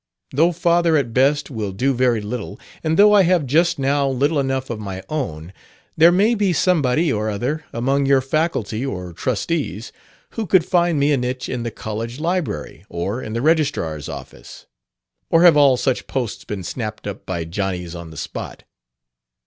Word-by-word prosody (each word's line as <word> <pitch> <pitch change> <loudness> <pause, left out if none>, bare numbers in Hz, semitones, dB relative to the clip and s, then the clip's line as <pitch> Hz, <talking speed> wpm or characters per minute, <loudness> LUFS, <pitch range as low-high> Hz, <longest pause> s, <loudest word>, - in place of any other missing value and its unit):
"Though 165 +6 +3
father, 170 -1 +2
at 120 -5 -1
best, 145 +4 +2
will 110 -5 -3
do 130 +8 0
very 120 -3 +2
little, 105 -1 -6 0.2
and 160 0 0
though 210 +1 +7
I 205 - +7
have 180 -4 +2
just 165 +6 +2
now 140 0 +1
little 140 +4 +1
enough 135 -1 -1
of 115 - -4
my 95 -2 -6
own, 90 - -4 0.4
there 165 +2 +6
may 205 +6 +3
be 200 -5 +1
somebody 155 -3 +2
or 110 0 -1
other 130 +10 -3
among 135 +4 0
your 135 -1 +5
faculty 135 -5 -1
or 90 -10 -5
trustees 120 - -2 0.4
who 225 -3 -4
could 175 -1 +4
find 175 -3 +2
me 145 +1 +3
a 145 - +3
niche 125 +1 -3
in 125 - -3
the 115 - -3
college 115 +3 -6
library 160 - -3
or 100 +8 -3
in 110 - -6
the 115 +2 -2
registrar's 140 - 0
office. - - -10 0.6
Or 165 +1 +4
have 175 -4 +8
all 140 -3 +5
such 130 0 -1
posts 125 -5 -3
been 100 -3 -5
snapped 110 +3 -5
up 100 -1 -7
by 85 -3 -3
Johnnys 90 -1 -3
on 85 -2 -8
the 80 - -12
spot? - - -6
130 Hz, 180 wpm, -20 LUFS, 105-160 Hz, 0.6 s, have